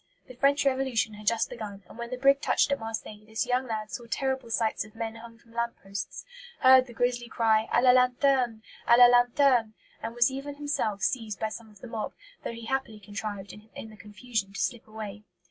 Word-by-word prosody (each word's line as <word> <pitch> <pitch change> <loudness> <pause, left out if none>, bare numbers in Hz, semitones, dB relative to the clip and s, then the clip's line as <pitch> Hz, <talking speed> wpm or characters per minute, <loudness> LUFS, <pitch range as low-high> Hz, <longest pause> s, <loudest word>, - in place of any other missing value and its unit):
The 255 - -12
French 280 +3 +2
Revolution 260 -5 +1
had 210 0 -11
just 230 0 +2
begun; 205 -4 -7
and - - -14
when 235 0 -6
the 255 - -4
brig 275 +2 +4
touched - - +2
at 280 - +1
Marseilles 220 -1 -6
this 220 +3 -1
young 250 +1 0
lad 215 -2 -4
saw 240 -4 -6
terrible 265 0 -1
sights 225 -2 0
of 215 0 -16
men 225 -1 -4
hung 230 0 -12
from 230 0 -22
lamp 235 0 -1
posts; 195 0 -6 0.4
heard 260 0 +7
the 240 - -11
grisly 245 0 0
cry, 220 -1 +2
"À 240 - +3
la 255 - +8
lanterne! 250 -2 +2 0.2
à 235 - +7
la 245 - +10
lanterne!" 245 -1 +4 0.3
and 230 +1 -5
was 240 +2 +4
even 275 +2 -6
himself 285 -9 -2
seized 220 -5 -1
by 220 - -1
some 220 0 -9
of 210 -2 -19
the - - -8
mob, 225 -2 -4 0.3
though - - -3
he 230 0 -9
happily 250 -4 -2
contrived, 205 -1 -6
in 220 +1 -11
the - - -13
confusion, 210 0 -4
to - - -6
slip 240 -3 -2
away. 215 -1 -7
230 Hz, 215 wpm, -28 LUFS, 215-255 Hz, 0.4 s, la